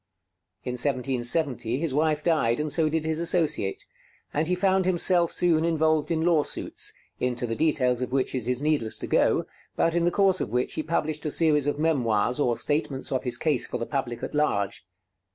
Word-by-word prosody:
In 125 - -4
1770 125 -1 0
his 155 -1 -2
wife 150 +1 +1
died, 150 -8 +1
and 150 0 -2
so 155 +2 +2
did 160 0 -1
his 160 0 -1
associate; 165 - +1 0.5
and 155 +2 0
he 180 - +1
found 190 0 +1
himself 175 -1 +4
soon 165 -3 +2
involved 160 -2 +1
in 160 -1 0
lawsuits, 165 -4 0 0.3
into 125 -1 -1
the 115 -1 -3
details 130 -5 +1
of 125 - -3
which 130 -1 0
it 125 -3 -3
is 125 +2 -1
needless 150 -8 0
to - - -6
go, - - +2 0.3
but 165 - +1
in 170 0 +1
the - - +4
course 190 0 +2
of - - -3
which 125 +3 -1
he - - -2
published 155 -1 -2
a - - 0
series 150 -2 +2
of 145 - -1
memoirs, 125 -6 0
or 120 -5 +1
statements 145 -3 -2
of 130 0 -2
his 120 -1 0
case 145 -2 0
for - - -4
the 115 - -4
public 120 -4 -4
at - - -5
large. 100 -10 -1
150 Hz, 195 wpm, -25 LUFS, 125-160 Hz, 0.5 s, himself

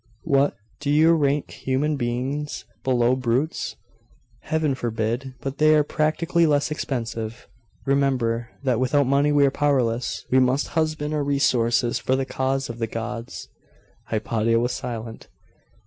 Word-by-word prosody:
'What! 140 -2 +2 0.2
do 145 - -3
you 155 +3 +5
rank 145 -2 +1
human 140 +4 -1
beings 135 +4 -3 0.2
below 125 -1 +3
brutes?' 130 +5 -1 0.6
'Heaven 155 -3 0
forbid! 120 +2 -2
But 135 0 -5
they 155 0 +6
are 150 - +4
practically 165 +3 +1
less 145 0 +1
expensive. 115 -5 -4 0.4
Remember, 125 -4 +1
that 125 -4 +1
without 135 +2 +2
money 140 +3 +3
we 145 -1 +5
are 135 - +2
powerless; 125 -5 0
we 130 - +5
must 130 +2 +2
husband 155 -2 -1
our 150 -1 0
resources 120 -4 +2
for 130 - +1
the 135 0 -1
cause 135 0 -1
of 120 0 -7
the 115 - -1
gods.' 115 +1 -6 0.6
Hypatia 115 +1 +1
was 120 +1 0
silent. 115 -2 -6
130 Hz, 140 wpm, -24 LUFS, 120-145 Hz, 0.6 s, they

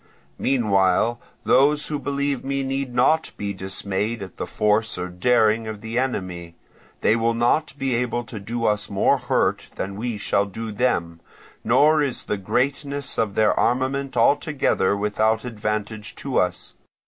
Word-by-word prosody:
Meanwhile 110 -2 +2 0.2
those 145 +2 +4
who 150 -2 -2
believe 140 -1 -1
me 140 0 -1
need 135 -1 -2
not 130 +6 +2
be 100 -1 -3
dismayed 100 +3 -3
at 95 - -11
the - - -4
force 105 0 +1
or 90 0 -4
daring 110 +3 +2
of 110 -1 -6
the 110 +2 -2
enemy. 90 -9 -3 0.5
They 110 - +4
will 115 0 +1
not 135 +5 +1
be 135 -2 -1
able 120 0 -1
to 115 -2 -8
do 115 +3 -3
us 105 0 0
more 100 - +2
hurt - - 0
than 95 +1 -4
we 115 +1 -3
shall 100 0 +1
do 110 +3 -6
them; 85 -8 -1 0.4
nor 155 +1 +4
is 140 -4 -2
the 105 - -2
greatness 140 +7 -1
of 105 -3 0
their 110 -1 +4
armament 130 +2 0
altogether 135 - +2
without 110 +2 +1
advantage 105 -2 -4
to - - -1
us. - - -1
115 Hz, 155 wpm, -23 LUFS, 105-135 Hz, 0.5 s, those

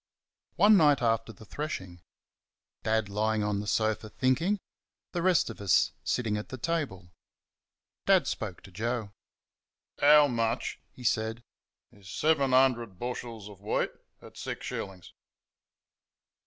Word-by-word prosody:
One 210 0 +6
night 150 -5 +5
after 115 0 +1
the 110 +1 -14
threshing. 95 - -5 0.8
Dad 110 -1 +1
lying 105 +1 0
on 105 -1 0
the 105 - -5
sofa, 110 0 0
thinking; 165 - +1 0.5
the 175 - -2
rest 180 -2 +3
of 110 - -11
us 95 -5 +3
sitting 110 -4 0
at 105 - -6
the 130 - -6
table. 130 - -3 1.0
Dad - - +5
spoke - - -4
to 95 - -13
Joe. 110 +2 -3 0.9
"How 150 0 +7
much," 115 -1 -1
he 125 - -14
said, 115 0 0 0.5
"is 100 -2 -15
seven 145 +1 +2
hundred 120 -6 +3
bushels 115 -2 -5
of 100 -2 -13
wheat 105 - 0 0.3
at - - -13
six - - -5
shillings?" 95 -3 -6
115 Hz, 130 wpm, -29 LUFS, 105-135 Hz, 1.0 s, How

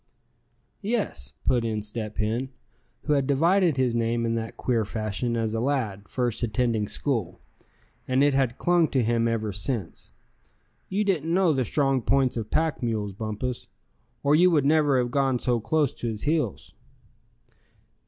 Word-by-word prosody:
"Yes," 200 - -2
put 125 -3 +2
in 110 -2 -2
Step 105 0 -5
Hen, 115 +5 -1 0.5
who 150 - +1
had 140 -2 +1
divided 165 +3 +3
his 130 -2 +2
name 115 0 0
in 115 - 0
that 115 -1 -4
queer 120 -3 +1
fashion 110 +3 -2
as 110 -1 -1
a 115 - -1
lad 115 -7 -2
first 120 -3 -1
attending 115 -2 0
school, 115 - -2 0.7
and 130 +2 +3
it 145 -1 +4
had 130 -3 +1
clung 175 -2 +3
to 130 -4 +1
him 115 0 +1
ever 110 -2 -1
since; 100 -1 -5 0.8
"you 200 +3 0
didn't 165 -6 0
know 180 -2 +3
the 130 -2 +1
strong 135 +1 +1
points 130 +1 +2
of 110 -3 -4
pack 160 -2 0
mules, 110 -4 -2
Bumpus, 110 +4 -4 0.6
or 140 - +3
you 180 +3 +6
would 150 -5 +2
never 145 -2 +4
have 120 -1 0
gone 135 -1 +2
so 120 -1 0
close 150 +4 +1
to 120 - -5
his 110 -2 -4
heels." 150 - -1
125 Hz, 165 wpm, -26 LUFS, 110-145 Hz, 0.8 s, you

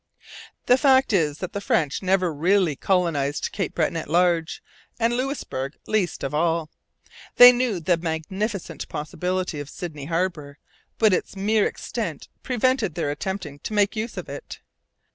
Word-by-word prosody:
The 250 +1 +5
fact 265 -3 +4
is 155 -6 +2
that 185 +1 -6
the 200 - -3
French 150 -7 0
never 185 -3 +1
really 175 +1 +2
colonized 150 -5 0
Cape 195 - -3
Breton 170 - 0
at 160 -3 -4
large, 170 -1 +1 0.4
and 230 +1 +2
Louisbourg 240 - -3
least 210 -5 -1
of 135 - -3
all. 160 0 0 0.6
They 245 0 +11
knew 240 -6 0
the 170 +1 +1
magnificent 180 +5 -4
possibilities 180 +1 -3
of 145 - -9
Sydney 150 -6 -7
harbour, 165 -3 -2 0.4
but 215 -3 +4
its 185 - -1
mere 210 +2 +2
extent - - -5
prevented 255 - 0
their 145 - -1
attempting 150 -2 -5
to 215 - -6
make 205 0 +2
use 220 0 -4
of 180 - -5
it. 140 0 -8
180 Hz, 150 wpm, -24 LUFS, 155-205 Hz, 0.6 s, They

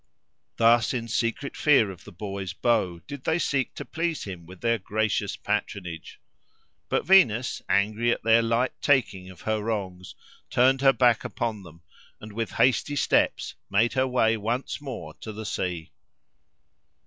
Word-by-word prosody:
Thus, 115 +2 +4
in 115 -2 -3
secret 115 +5 -2
fear 135 -9 +4
of 95 - -13
the - - -11
boy's 95 0 -5
bow, 105 -6 +1
did 140 -2 -8
they 160 - +1
seek 135 -5 -1
to - - -6
please 165 -1 -2
him 90 -4 -8
with 90 0 -13
their 115 -1 +1
gracious 105 0 -1
patronage. 100 -5 -4 0.7
But - - 0
Venus, 130 - +4
angry 110 +4 +2
at - - -2
their 115 +1 +5
light 115 +2 +1
taking 105 -10 +1
of 90 -3 -13
her 110 -1 -1
wrongs, 95 -4 -4 0.3
turned 130 +2 +3
her 135 -1 +6
back 125 -3 +3
upon 110 -3 -3
them, 85 -2 -15 0.4
and 105 0 -10
with 115 +1 -3
hasty 130 +3 +2
steps - - +1 0.2
made 110 +4 +2
her 130 -1 +1
way 115 -3 +2
once 115 +7 -3
more 115 - -7
to 110 - -6
the 110 +1 -7
sea. 90 -5 -3
110 Hz, 160 wpm, -26 LUFS, 100-125 Hz, 0.7 s, her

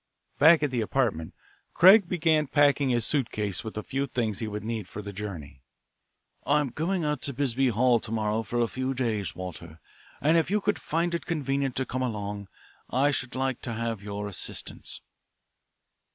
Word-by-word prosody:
Back 160 +1 +7
at 145 - +1
the 120 -3 0
apartment, 110 -9 -1 0.4
Craig 190 +1 +7
began 160 -4 +2
packing 145 -1 +3
his 120 -3 +2
suitcase 110 - -1
with 110 - -7
the 110 - -4
few 135 +4 -2
things 115 -6 -2
he 110 - -3
would 105 0 -5
need 110 -3 -4
for 105 - -8
a 100 - -5
journey. 85 -10 -7 0.8
"I'm 145 -1 +2
going 170 +6 -1
out 150 -3 -1
to 140 - -1
Bisbee 135 0 +1
Hall 120 +1 +3
to 110 - -8
morrow 110 0 0
for 120 +1 -3
a 115 - +2
few 130 +3 -3
days, 110 - -2
Walter, 85 -3 -8 0.4
and 155 +4 +3
if 165 0 +1
you 210 +2 +2
could 205 0 0
find 170 +2 -1
it 170 - -3
convenient 140 -5 -1
to 130 - -1
come 130 0 -3
along 105 -4 -3 0.4
I 140 +3 +2
should 130 -3 -3
like 130 -1 -1
to 120 - -4
have 115 -2 -3
your 105 0 -5
assistance." 100 -4 -5
125 Hz, 180 wpm, -27 LUFS, 105-145 Hz, 0.8 s, Back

